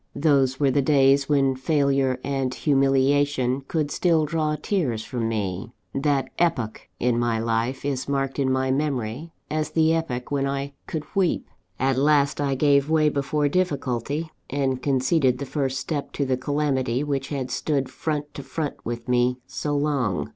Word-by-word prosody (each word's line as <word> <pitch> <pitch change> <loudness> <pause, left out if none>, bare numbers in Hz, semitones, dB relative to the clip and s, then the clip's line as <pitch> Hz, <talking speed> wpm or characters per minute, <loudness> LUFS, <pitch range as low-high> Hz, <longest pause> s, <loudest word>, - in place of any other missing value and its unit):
Those 140 -3 +2
were 140 -2 +3
the 140 - +2
days 140 0 +4
when 135 -2 +3
failure 135 -2 +1
and 135 -2 -1
humiliation 135 -1 +2
could 150 -3 -1
still 165 -3 +2
draw 155 0 0
tears 145 - -1
from 115 -3 -2
me: 105 0 -3 0.2
that 140 -1 0
epoch 125 - -1
in 120 -1 +1
my 120 -1 +1
life 115 +4 -1
is 140 -1 -2
marked 135 0 -1
in 130 -1 +2
my 130 0 +1
memory 135 +1 -2 0.2
as 155 0 -1
the 160 0 +3
epoch 130 -7 -2
when 140 -1 +1
I 140 +1 -3
could 155 -2 -3
weep. 190 -3 +1 0.3
"At 135 0 +2
last, 145 0 +3
I 140 -1 +1
gave 140 +1 +3
way 155 -1 +4
before 145 +1 0
difficulty, 145 -2 -1 0.2
and 135 -2 -1
conceded 130 -1 +2
the 140 - -4
first 135 -2 -1
step 145 -2 -3
to 140 - -1
the 130 -1 +1
calamity 135 -2 0
which 140 -2 -2
had 135 -3 -4
stood 140 -4 0
front 150 -2 -3
to - - -6
front 150 +1 -4
with 120 0 -5
me 125 0 +2
so 145 +2 -2
long. 125 - 0
140 Hz, 165 wpm, -24 LUFS, 130-150 Hz, 0.3 s, days